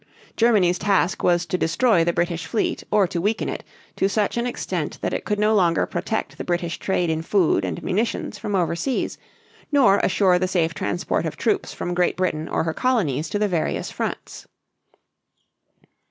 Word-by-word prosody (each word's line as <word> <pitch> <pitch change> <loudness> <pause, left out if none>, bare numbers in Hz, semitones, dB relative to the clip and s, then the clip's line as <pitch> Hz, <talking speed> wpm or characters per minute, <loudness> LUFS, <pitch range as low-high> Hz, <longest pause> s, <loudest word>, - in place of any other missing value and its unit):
Germany's 200 -7 +3
task 195 -3 +1
was 175 -1 +2
to 180 +2 -2
destroy 175 +2 +3
the 170 - +2
British 170 0 -2
fleet 225 - -1
or 205 -2 +4
to 175 -1 -3
weaken 210 +4 0
it - - -4 0.3
to 195 - +2
such 205 0 0
an 235 +1 0
extent 245 - -3
that - - -2
it - - -3
could 210 - 0
no 210 +1 +3
longer 175 -5 +3
protect 220 - -3
the - - -3
British 175 -1 -2
trade 180 -3 0
in 160 0 -1
food 165 - +2
and 90 -3 -4
munitions 220 +5 -2
from 210 -2 -2
over 175 -2 +1
seas, 260 +9 -2 0.5
nor 245 -9 +5
assure 185 -2 +3
the 185 - 0
safe 170 -3 0
transport 175 +3 -1
of - - -6
troops 400 -2 0
from 175 - -4
Great 180 0 +1
Britain 160 -4 -1
or - - 0
her 160 -1 -2
colonies 165 - 0
to - - -1
the 210 0 +1
various 170 -5 -2
fronts. - - -5
185 Hz, 185 wpm, -23 LUFS, 170-210 Hz, 0.5 s, nor